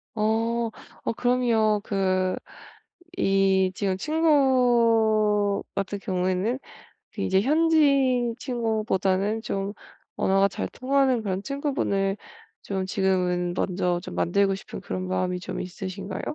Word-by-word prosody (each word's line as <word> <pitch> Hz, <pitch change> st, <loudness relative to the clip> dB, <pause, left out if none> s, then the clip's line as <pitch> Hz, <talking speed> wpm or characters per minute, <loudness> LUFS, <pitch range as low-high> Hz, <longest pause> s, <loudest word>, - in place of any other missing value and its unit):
어. 225 Hz, +2 st, 0 dB, 0.4 s
어 -, -, 0 dB
그럼요. 230 Hz, -4 st, +2 dB
그 185 Hz, -2 st, 0 dB, 0.8 s
이 195 Hz, -, +3 dB
지금 190 Hz, -1 st, -1 dB
친구 230 Hz, -8 st, +3 dB
같은 200 Hz, +1 st, -3 dB
경우에는 185 Hz, +4 st, -1 dB, 0.5 s
그 -, -, -5 dB
이제 190 Hz, -, +2 dB
현지인 275 Hz, -4 st, +3 dB
친구보다는 220 Hz, -4 st, 0 dB
좀 195 Hz, -2 st, -3 dB, 0.5 s
언어가 195 Hz, +1 st, +3 dB
잘 -, -, -4 dB
통하는 260 Hz, -2 st, +1 dB
그런 190 Hz, -2 st, -2 dB
친구분을 210 Hz, -8 st, -1 dB, 0.5 s
좀 190 Hz, -1 st, -3 dB
지금은 180 Hz, -2 st, 0 dB
먼저 180 Hz, -2 st, 0 dB
좀 -, -, -8 dB
만들고 195 Hz, +2 st, +2 dB
싶은 195 Hz, -, -9 dB
그런 185 Hz, 0 st, -4 dB
마음이 185 Hz, -1 st, -1 dB
좀 -, -, -5 dB
있으신가요? 190 Hz, +1 st, -6 dB
205 Hz, 240 characters per minute, -25 LUFS, 190-240 Hz, 0.8 s, 이